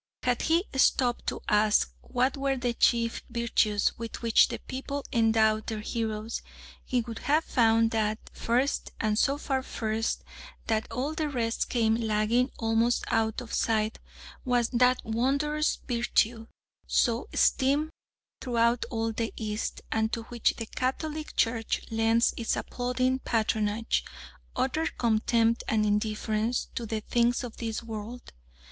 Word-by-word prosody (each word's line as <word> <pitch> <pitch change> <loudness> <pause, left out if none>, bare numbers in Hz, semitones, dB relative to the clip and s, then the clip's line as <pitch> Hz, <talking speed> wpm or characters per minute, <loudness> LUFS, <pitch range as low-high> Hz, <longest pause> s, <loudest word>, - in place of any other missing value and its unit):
Had 250 -1 +1
he 330 +3 +2
stopped 250 -2 +2
to - - -2
ask 210 0 +3
what 255 +1 0
were 275 -1 0
the 245 -1 -1
chief 230 0 +2
virtues 230 -3 +1
with 230 0 -6
which 230 -2 +5
the - - -4
people 275 +2 -5
endowed 220 -1 +3
their 220 -1 -3
heroes, 220 0 -3 0.4
he 250 -1 0
would 230 -1 -7
have 305 +3 +2
found 225 -3 +3
that 215 -1 0 0.2
first, 250 +4 0
and 215 -1 +1
so 275 +1 +2
far 270 -3 -1
first 225 -3 -2 0.4
that 220 -1 -1
all 275 +5 -2
the 315 -1 -1
rest 235 -4 -1
came 225 -3 +2
lagging 225 +2 +1
almost 225 +2 +1
out 220 -1 +1
of 235 - -9
sight, 220 -1 0 0.4
was 245 -3 +1
that 250 +1 +3
wondrous 280 +7 +1
virtue 235 -1 +1 0.4
so 235 -1 +1
esteemed 285 +4 +2 0.5
throughout 235 -1 +1
all 225 -1 -1
the 225 0 -2
East, 215 -1 -3
and 220 0 +1
to 230 - -3
which 240 -2 +1
the 230 - -4
Catholic 300 +6 -3
Church 230 -1 0
lends 225 +1 +3
its 230 - -1
applauding 255 +1 -1
patronage 220 -1 0 0.5
utter 270 +6 0
contempt 230 0 +1
and 215 -1 +2
indifference 215 +2 0
to 235 - -4
the 220 0 -2
things 240 +3 +1
of 240 -2 -7
this 225 -1 -4
world. 225 +2 -7
230 Hz, 140 wpm, -28 LUFS, 220-250 Hz, 0.5 s, which